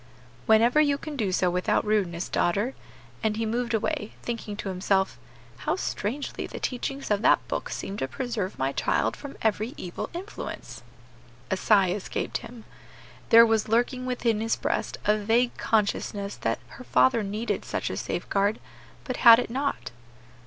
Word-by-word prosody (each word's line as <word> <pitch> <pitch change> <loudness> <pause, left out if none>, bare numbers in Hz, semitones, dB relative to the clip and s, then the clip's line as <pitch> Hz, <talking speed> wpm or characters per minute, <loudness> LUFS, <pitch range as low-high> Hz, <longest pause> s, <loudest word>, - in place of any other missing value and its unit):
"Whenever 235 +7 +5
you 285 -2 +3
can 305 0 -7
do 215 -8 0
so 180 -1 +2
without 180 +3 +1
rudeness, 190 -5 0
daughter;" 205 +9 0 0.5
and 215 -1 0
he 225 - 0
moved 235 +2 -1
away, 210 0 -2
thinking 230 -3 -4
to 200 - -4
himself, 190 - 0 0.4
"How - - -1
strangely 225 +8 -3
the - - -7
teachings 270 0 -3
of 205 -1 +2
that - - +4
book - - -3
seem 195 - -5
to 130 - -2
preserve 225 - -3
my 135 +1 0
child - - 0
from 285 -1 -9
every 220 +3 0
evil 175 -1 -5
influence." 365 +5 -7 0.7
A - - +3
sigh 195 -2 +4
escaped 195 +1 -3
him. 235 -2 -11 0.7
There 230 +1 +9
was 225 -2 +1
lurking 250 +3 +1
within 235 -3 0
his 225 0 +1
breast - - -2
a 210 - +4
vague 235 +4 +2
consciousness 205 -2 0
that 115 0 -1
her - - -11
father 125 - +3
needed 210 +3 -2
such - - -3
a - - -3
safeguard, 200 +2 -1 0.4
but 255 - -4
had 230 -2 +9
it 245 - -2
not. 275 +3 -2
220 Hz, 160 wpm, -26 LUFS, 195-245 Hz, 0.7 s, There